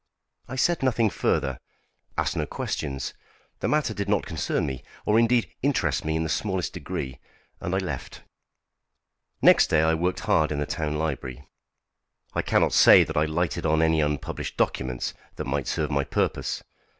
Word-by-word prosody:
I 130 Hz, -, -6 dB
said 170 Hz, +5 st, +2 dB
nothing 115 Hz, -5 st, +2 dB
further; -, -, 0 dB, 0.6 s
asked -, -, 0 dB
no -, -, -1 dB
questions. 70 Hz, -4 st, -3 dB, 0.5 s
The -, -, -1 dB
matter 150 Hz, -6 st, +1 dB
did 100 Hz, -1 st, -3 dB
not 105 Hz, -1 st, +2 dB
concern 80 Hz, -2 st, -1 dB
me, 65 Hz, -3 st, -4 dB, 0.2 s
or 105 Hz, +2 st, +4 dB
indeed 115 Hz, 0 st, +2 dB
interest 140 Hz, 0 st, +1 dB
me 80 Hz, 0 st, 0 dB
in 80 Hz, -, 0 dB
the -, -, -2 dB
smallest 95 Hz, 0 st, -1 dB
degree; 65 Hz, -1 st, -5 dB, 0.4 s
and 90 Hz, -, -2 dB
I -, -, +2 dB
left. 95 Hz, -2 st, -5 dB, 1.2 s
Next -, -, +7 dB
day 80 Hz, 0 st, +3 dB
I 80 Hz, 0 st, +3 dB
worked 90 Hz, +5 st, -1 dB
hard 105 Hz, -9 st, +2 dB
in 75 Hz, -, -1 dB
the 75 Hz, -, -1 dB
town 75 Hz, -2 st, -2 dB
library. 70 Hz, -4 st, -4 dB, 0.9 s
I -, -, +1 dB
cannot -, -, +2 dB
say -, -, +8 dB
that 80 Hz, -, -6 dB
I 75 Hz, 0 st, +3 dB
lighted 80 Hz, +2 st, -1 dB
on 80 Hz, 0 st, +3 dB
any 80 Hz, -1 st, +3 dB
unpublished 75 Hz, -1 st, -3 dB
documents 65 Hz, -2 st, -1 dB, 0.2 s
that -, -, -4 dB
might 70 Hz, 0 st, -2 dB
serve 75 Hz, -1 st, -1 dB
my 70 Hz, 0 st, +1 dB
purpose. 70 Hz, -, -1 dB
80 Hz, 170 wpm, -26 LUFS, 75-100 Hz, 1.2 s, say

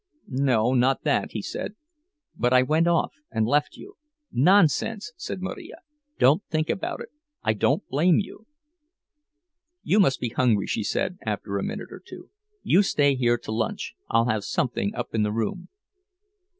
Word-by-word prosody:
"No, 125 Hz, -3 st, +3 dB
not 130 Hz, +1 st, +2 dB
that," -, -, 0 dB
he -, -, -4 dB
said. 210 Hz, -, -5 dB, 0.6 s
"But 125 Hz, +1 st, +1 dB
I 130 Hz, 0 st, +6 dB
went 155 Hz, +5 st, +2 dB
off 170 Hz, -1 st, +1 dB, 0.2 s
and 110 Hz, -1 st, 0 dB
left 145 Hz, +6 st, +1 dB
you—" 400 Hz, +1 st, -13 dB, 0.3 s
"Nonsense!" 200 Hz, -, +3 dB
said 185 Hz, +1 st, -6 dB
Marija. 190 Hz, -, -6 dB, 0.4 s
"Don't 150 Hz, +10 st, +4 dB
think 155 Hz, 0 st, -1 dB
about -, -, -4 dB
it. -, -, -8 dB, 0.3 s
I 110 Hz, -, +2 dB
don't 135 Hz, -, 0 dB
blame 160 Hz, +6 st, +3 dB
you." 210 Hz, +2 st, -5 dB, 1.4 s
"You 210 Hz, -, +3 dB
must 160 Hz, -10 st, +3 dB
be 120 Hz, -, -2 dB
hungry," 115 Hz, -4 st, +2 dB
she -, -, -2 dB
said, 180 Hz, -, -2 dB
after 105 Hz, -2 st, -3 dB
a -, -, -3 dB
minute -, -, -5 dB
or -, -, -10 dB
two. -, -, -12 dB, 0.3 s
"You 185 Hz, -, +4 dB
stay 145 Hz, -8 st, +2 dB
here 120 Hz, -2 st, +2 dB
to 115 Hz, -, -8 dB
lunch—I'll 115 Hz, +1 st, -1 dB
have 110 Hz, -3 st, 0 dB
something 105 Hz, -2 st, -1 dB
up -, -, -5 dB
in 110 Hz, -, +1 dB
the 105 Hz, 0 st, +1 dB
room." 115 Hz, -, -3 dB
130 Hz, 165 wpm, -25 LUFS, 115-175 Hz, 1.4 s, I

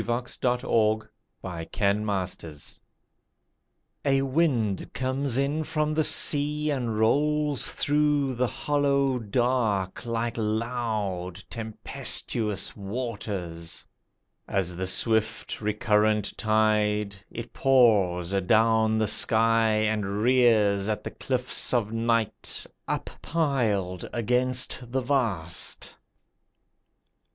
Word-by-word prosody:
THE -, -, -13 dB, 0.2 s
SOUL 115 Hz, -3 st, +1 dB, 0.4 s
OF 85 Hz, -3 st, -6 dB
THE 100 Hz, -1 st, 0 dB
SEA 80 Hz, -4 st, -9 dB, 1.2 s
A 135 Hz, -1 st, +2 dB
wind 130 Hz, -, 0 dB
comes 130 Hz, 0 st, -1 dB
in 140 Hz, +3 st, 0 dB
from 155 Hz, 0 st, -1 dB
the 155 Hz, 0 st, +2 dB
sea, 150 Hz, +1 st, +3 dB
And 120 Hz, -6 st, -2 dB
rolls 145 Hz, +5 st, +1 dB
through 145 Hz, -2 st, +2 dB
the 125 Hz, +1 st, 0 dB
hollow 140 Hz, -2 st, +1 dB
dark 110 Hz, -4 st, 0 dB
Like 115 Hz, 0 st, -2 dB
loud, 105 Hz, -5 st, -2 dB
tempestuous 110 Hz, -1 st, -2 dB
waters. 100 Hz, -6 st, -5 dB, 0.6 s
As 90 Hz, -3 st, -1 dB
the 95 Hz, +1 st, -3 dB
swift 110 Hz, +4 st, 0 dB
recurrent 105 Hz, -1 st, +1 dB
tide, 105 Hz, -2 st, +1 dB
It 115 Hz, 0 st, -8 dB
pours 100 Hz, -9 st, +3 dB
adown 110 Hz, +3 st, +3 dB
the 110 Hz, -1 st, +1 dB
sky, 115 Hz, +1 st, +3 dB
And 105 Hz, -1 st, 0 dB
rears 110 Hz, -5 st, +3 dB
at 105 Hz, -, -2 dB
the -, -, -5 dB
cliffs 130 Hz, -1 st, -1 dB
of 110 Hz, -3 st, 0 dB
night 115 Hz, -1 st, -1 dB, 0.2 s
Uppiled 115 Hz, -, -1 dB
against 125 Hz, +1 st, -1 dB
the 130 Hz, +1 st, 0 dB
vast. 115 Hz, -, 0 dB
115 Hz, 95 wpm, -26 LUFS, 105-130 Hz, 1.2 s, sea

